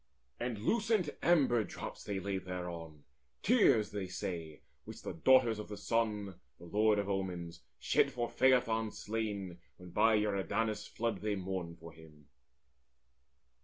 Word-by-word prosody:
And 120 -2 -2
lucent 210 - +1
amber 135 -9 +4
drops - - -7
they 100 -2 -3
laid 95 -1 -3
thereon, 85 -4 -6 0.4
Years, 200 - +4
say 100 -3 -4
they, 80 -4 -5 0.2
which - - -10
the - - -4
Daughters 120 +4 +4
of 105 - -6
the 105 - -6
Sun, 105 -5 -1 0.2
The 85 - -13
Lord 105 +4 +3
of 100 -1 -1
Omens, 90 -4 -3 0.2
shed - - +2
for 120 -1 -2
Phaethon 120 -4 +3
slain, 100 -6 -4 0.2
When 90 -1 -12
by 110 +3 +4
Eridanus' 105 +1 -1
flood 115 -4 -2
they 105 -1 0
mourned 90 -3 -4
for 85 0 -11
him. 75 -1 -16
105 Hz, 140 wpm, -34 LUFS, 90-115 Hz, 0.4 s, amber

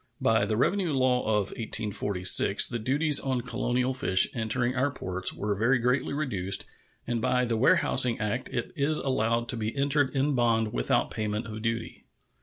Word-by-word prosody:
By 110 -2 +2
the 110 - -1
revenue 180 - 0
law 130 -2 +1
of 105 -2 0
1846 100 -3 +2
the 120 - -4
duties 145 +6 +2
on 130 -2 -2
colonial 125 +1 -2
fish 95 -7 +3
entering 120 +2 -1
our 130 +2 0
ports 95 -7 -2
were 105 0 -3
very 115 +6 +2
greatly 125 +3 -1
reduced, 105 -11 -2 0.4
and 120 -1 -2
by 125 +1 +1
the 115 -1 -1
warehousing 125 +1 +3
act 110 +3 -3
it 120 - -4
is 150 +1 -1
allowed 115 -3 -1
to 125 - -1
be 110 +4 -4
entered 140 0 +1
in 140 +2 +1
bond 115 -3 +1
without - - 0
payment 105 +1 -3
of 110 0 -8
duty. 115 0 -4
120 Hz, 170 wpm, -27 LUFS, 110-130 Hz, 0.4 s, fish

